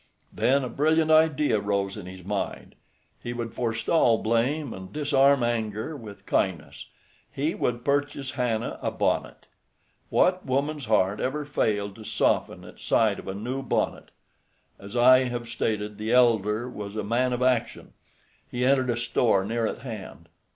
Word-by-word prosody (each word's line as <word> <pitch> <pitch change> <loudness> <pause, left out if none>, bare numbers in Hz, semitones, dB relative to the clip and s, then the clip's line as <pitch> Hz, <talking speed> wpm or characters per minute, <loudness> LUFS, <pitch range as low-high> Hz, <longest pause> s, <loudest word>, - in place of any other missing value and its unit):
Then 135 +2 +2
a 125 - -3
brilliant 160 +3 +2
idea 155 -6 +4
rose 100 -1 -1
in 100 -4 -8
his 90 -1 -10
mind. 100 0 -4 0.5
He 120 - -5
would 115 -2 -5
forestall 115 +1 +2
blame 120 +6 0
and 95 0 -9
disarm 140 -3 +3
anger 110 +3 -2
with 110 -7 -11
kindness—he 85 - -3
would 120 0 -2
purchase 140 -1 -1
Hannah 120 -3 -2
a - - 0
bonnet. - - -2 0.6
What 185 0 +2
woman's 140 +2 -1
heart 105 -2 +2
ever 150 +3 -2
failed 105 -8 -1
to 110 - -10
soften - - 0
at - - -14
sight 110 -3 +2
of - - -11
a 95 - -4
new 125 +6 -4
bonnet? 130 - -2 0.7
As 100 +5 -7
I 130 +2 +6
have 120 -1 -4
stated, 105 -2 -3
the 110 +1 -2
elder 115 -2 +3
was 105 -4 -7
a 110 - -2
man 120 +5 +1
of 125 0 -1
action. 125 -3 0 0.6
He 125 0 -1
entered 130 -1 +3
a 120 - 0
store 115 -4 +1
near 115 +1 -1
at 120 - -6
hand. 110 -6 -8
120 Hz, 155 wpm, -26 LUFS, 105-135 Hz, 0.7 s, I